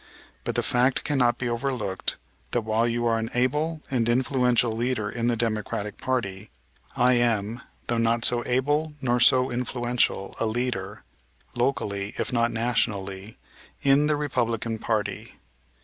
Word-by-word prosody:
But - - -2
the - - +1
fact 125 +2 +2
cannot 125 -4 +2
be 125 - -2
overlooked 120 -5 -2 0.4
that 120 - +2
while 110 +2 +1
you 120 0 -1
are 115 -1 +2
an 110 0 -3
able 150 +6 0
and 120 -3 +1
influential 125 -1 +2
leader 115 -1 -1
in 120 -1 -1
the 120 - +2
Democratic 110 -2 -2
party, 105 -6 -2 0.5
I 125 +1 +4
am, 115 -1 +1 0.2
though 120 -1 0
not 115 0 +2
so 120 -1 +3
able 145 +5 +1
nor 125 -2 +1
so 130 +1 +5
influential, 120 -4 -1
a 115 - +1
leader, 110 -3 -2 0.5
locally, 105 -5 -1
if - - -2
not 120 -1 +2
nationally, 105 -4 -2 0.5
in 140 +2 +4
the 150 - +2
Republican 115 -6 -1
party. 110 -2 -2
120 Hz, 145 wpm, -26 LUFS, 110-125 Hz, 0.5 s, so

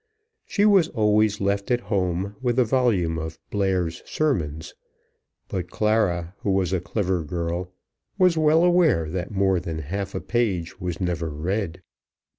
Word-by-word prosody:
She 205 - +2
was 195 -6 +5
always 105 -3 +2
left 100 0 -1
at 120 -1 +2
home 95 -2 -1
with 120 -1 0
a 125 - +5
volume 105 -10 +1
of 80 0 -6
Blair's 95 -5 0
Sermons; 80 - -2 0.7
but 90 -2 -4
Clara, 100 -6 +1
who - - -3
was 95 -2 +1
a 95 - +2
clever 95 -2 -1
girl, 85 +2 -3 0.5
was 180 -3 +4
well 160 +1 +4
aware 175 - +3
that 90 0 -3
more 95 -2 +2
than 85 -2 -5
half 95 +7 -4
a - - -1
page 100 -9 -1
was 90 -2 -3
never 85 -3 -1
read. 90 +3 -3
95 Hz, 150 wpm, -24 LUFS, 85-115 Hz, 0.7 s, was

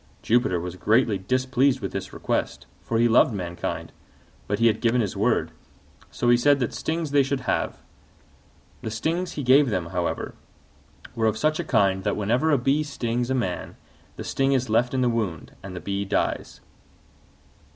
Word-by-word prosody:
Jupiter 115 -6 +2
was 90 +1 -6
greatly 110 0 +2
displeased 130 +5 +1
with 100 -5 -4
this 95 -1 -5
request, - - -2 0.2
for 115 - -2
he 120 +1 +4
loved 115 0 +4
mankind: 85 -2 -4 0.6
but 105 - 0
he 115 - +2
had 115 - +3
given 120 +1 +2
his 105 -4 -1
word, 110 +4 +1 0.6
so 120 - -1
he 120 - +6
said 145 +3 +4
that 125 - -1
stings 160 -2 -2
they 145 0 +5
should 135 0 -1
have. 125 - -1 1.0
The - - -4
stings 165 +12 -2
he 145 - -4
gave 135 +2 +5
them, 90 -5 -2
however, 90 -2 -2 0.8
were 110 -1 +1
of 110 0 0
such 155 +6 +1
a - - 0
kind 95 -10 +2
that - - -1
whenever 120 +9 +1
a 145 - +4
bee 135 +4 +1
stings 120 -5 -2
a 130 - +1
man 105 -8 -3 0.4
the - - -6
sting 135 0 +1
is 130 -4 0
left 120 +3 +2
in 130 - +1
the 125 - +3
wound 105 -10 -2
and 95 -1 -8
the - - -4
bee 100 +3 -3
dies. 95 - -2
120 Hz, 180 wpm, -25 LUFS, 100-135 Hz, 1.0 s, he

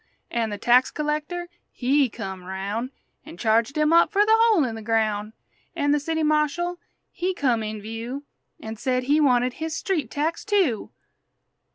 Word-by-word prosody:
An' 230 -2 0
the 205 - -4
tax 245 +4 +4
collector, 300 +4 -3 0.2
he 270 +1 +2
come 190 -3 -7
roun' 200 +6 -4 0.3
An' - - -11
charged 225 +7 +1
him 305 +1 +3
up 335 - +5
fer 410 0 +4
the 440 - +4
hole 445 -7 +5
in 240 -3 -2
the 225 - -7
groun'! 215 -1 0 0.4
An' 290 -3 +1
the 295 - +3
city 320 +2 -2
marshal 310 +4 +1 0.3
he 370 +1 -2
come 245 -7 +1
in 215 0 -4
view 225 +6 -6 0.4
An' 220 -7 -7
said 255 +2 0
he 290 +4 +3
wanted 250 -3 +3
his 320 +2 -4
street 335 - -1
tax, 310 +5 -2
too! 380 - +1
270 Hz, 170 wpm, -24 LUFS, 225-320 Hz, 0.4 s, up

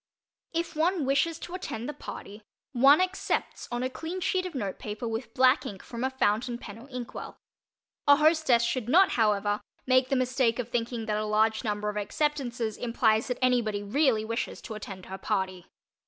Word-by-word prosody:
If 335 -1 -2
one 330 0 +1
wishes 300 +5 +1
to 345 - -9
attend 245 -10 -5
the 295 - -4
party, 205 -5 -9 0.3
one 275 +4 +6
"accepts" 370 +1 -1
on 240 +1 -2
a 255 - 0
clean 325 +8 -5
sheet 370 0 0
of 345 - -10
note 200 -7 -3
paper 210 +2 -5
with 225 +1 -4
black 260 +3 +5
ink 200 -8 -7
from 235 +1 -6
a 260 - +2
"fountain" 240 -1 0
pen 220 -2 -10
or 265 +4 -14
inkwell. 250 -2 -7 0.7
A 285 - +9
hostess 305 -5 +4
should 235 0 -1
not, 370 +7 +6
however, 210 -2 +1 0.2
make 255 0 +3
the 275 - +2
mistake 255 -2 +1
of 245 -2 -3
thinking 235 -1 -2
that 210 -1 -1
a - - -2
large 220 +1 +2
number 210 -2 -2
of 210 0 -2
"acceptances" 240 -1 -1
implies 225 -2 +2
that 250 -1 -2
anybody 225 -5 +2
really 225 0 +2
wishes 230 +2 -3
to 225 - -6
attend 195 -3 -8
her 190 +1 -7
party. 190 -3 -2
240 Hz, 185 wpm, -28 LUFS, 215-275 Hz, 0.7 s, A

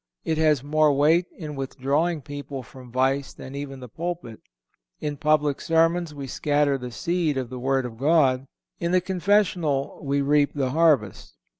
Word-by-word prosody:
It 160 -1 0
has 150 -4 +3
more 155 +1 +3
weight 155 +5 +3
in 150 -3 -6
withdrawing 140 +4 -1
people 145 -1 -7
from 125 0 -13
vice 135 +2 0
than 130 - -10
even 140 -1 -6
the 125 - -8
pulpit. 165 -4 -5 0.6
In 150 -1 -3
public 150 -1 +1
sermons 165 0 +2
we 140 -2 -7
scatter 145 +1 +1
the 125 0 -6
seed 165 +2 -1
of 130 -2 -3
the 130 - -5
Word 135 0 0
of 115 -2 -8
God; 135 -3 +3 0.3
in 170 +1 -1
the 185 - +5
confessional 180 -6 +1
we 140 0 0
reap 145 +1 +2
the 135 -3 0
harvest. 145 - +1
145 Hz, 165 wpm, -25 LUFS, 135-160 Hz, 0.6 s, the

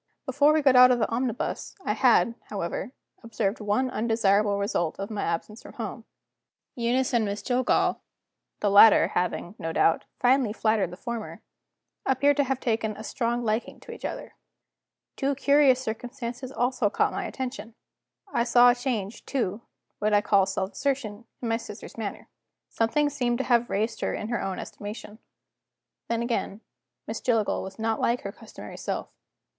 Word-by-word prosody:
Before 285 +2 +4
we 310 -1 +2
got 270 -2 +5
out 250 0 +9
of 250 - +4
the 225 - +1
omnibus 240 0 -3
I - - +1
had, 235 - +4
however, 195 +3 -4 0.3
observed 230 -3 -2
one 210 +5 0
undesirable 210 -3 +2
result 200 -5 -1
of 195 +2 -5
my 210 -2 -3
absence 170 +7 -3
from - - -12
home. - - -6 0.7
Eunice 245 +2 0
and 235 -2 +3
Miss 205 0 -3
Jillgall 255 0 +1 0.6
the 205 - +2
latter 205 +2 +8
having, 180 0 -2
no 165 - -3
doubt, 165 0 +2
finely 250 -3 +3
flattered 215 -5 +1
the 180 - -10
former 235 0 -6 0.6
appeared 280 +2 +2
to 285 - +3
have 265 0 -1
taken 220 -3 -1
a 215 - -8
strong 240 +1 -1
liking 220 +2 -2
to - - -10
each - - -10
other. - - -5 0.8
Two 275 +1 0
curious 280 -1 +4
circumstances 245 +2 -5
also 245 -4 +1
caught - - +1
my - - -3
attention. 250 -4 -6 0.6
I 235 - +2
saw 245 0 +6
a - - 0
change 235 -5 -3
to, 230 -6 -2 0.4
what 210 0 +1
I 205 - +5
call 195 -2 +3
self 190 0 -2
assertion, 250 -6 -2 0.2
in - - -1
my 225 0 +1
sister's 215 -2 -10
manner; 215 -3 -6 0.4
something 260 +6 +1
seemed 245 -4 0
to 265 - -1
have 240 -2 +2
raised 220 +3 -1
her - - -1
in 215 - -5
her 240 - -1
own 195 -1 -3
estimation. 210 +1 -8 0.9
Then, 230 0 -1
again, 230 -3 -2 0.4
Miss - - -5
Jillgall 225 -4 +1
was 190 0 -8
not 220 0 -1
like 240 +1 +1
her 200 - -5
customary 220 +1 -11
self. - - -3
230 Hz, 170 wpm, -26 LUFS, 210-250 Hz, 0.9 s, out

